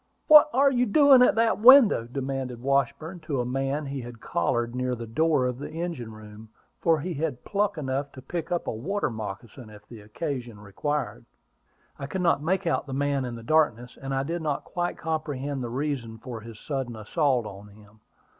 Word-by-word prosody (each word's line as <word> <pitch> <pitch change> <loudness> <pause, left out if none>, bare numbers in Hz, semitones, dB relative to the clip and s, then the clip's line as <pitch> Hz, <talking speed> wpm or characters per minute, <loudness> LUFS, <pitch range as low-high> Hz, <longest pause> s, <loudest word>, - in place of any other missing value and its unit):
"What 305 0 +9
are 275 +2 +4
you 250 -1 +1
doing 275 +3 +6
at 250 - +5
that 225 -1 +2
window?" 235 - +7
demanded 135 -2 -4
Washburn, 140 +6 -1
to 155 -4 -3
a 120 - -1
man 135 +4 -2
he 140 -1 -5
had 120 -1 -10
collared 120 -7 -1
near 125 0 -1
the 115 -1 -7
door 150 +3 +1
of 125 0 -3
the - - -6
engine 160 -9 -5
room, 110 0 -12 0.3
for 165 -2 +2
he 175 +3 -4
had 150 -4 -4
pluck 205 -2 0
enough 140 -1 -3
to 130 - -10
pick 170 -1 -5
up 175 - -1
a - - -2
water 165 - -2
moccasin, 110 +2 -8
if 105 -1 -15
the 115 -3 -11
occasion 120 0 -5
required. 145 +9 -3 0.8
I 140 - -5
could 185 +6 -3
not 170 -5 +2
make 180 +5 0
out 165 - 0
the 135 - -6
man 140 -1 0
in 120 -1 -5
the 115 - -10
darkness; 125 -4 +1
and 135 0 -5
I 135 0 0
did 165 +4 -3
not 150 -3 -2
quite 175 0 -3
comprehend 145 -4 -3
the 120 - -4
reason 125 -3 -3
for 115 -1 -8
his 115 -1 -11
sudden 135 -5 -4
assault 125 +3 0
on 100 0 -9
him. 105 +1 -19
135 Hz, 200 wpm, -26 LUFS, 120-160 Hz, 0.8 s, What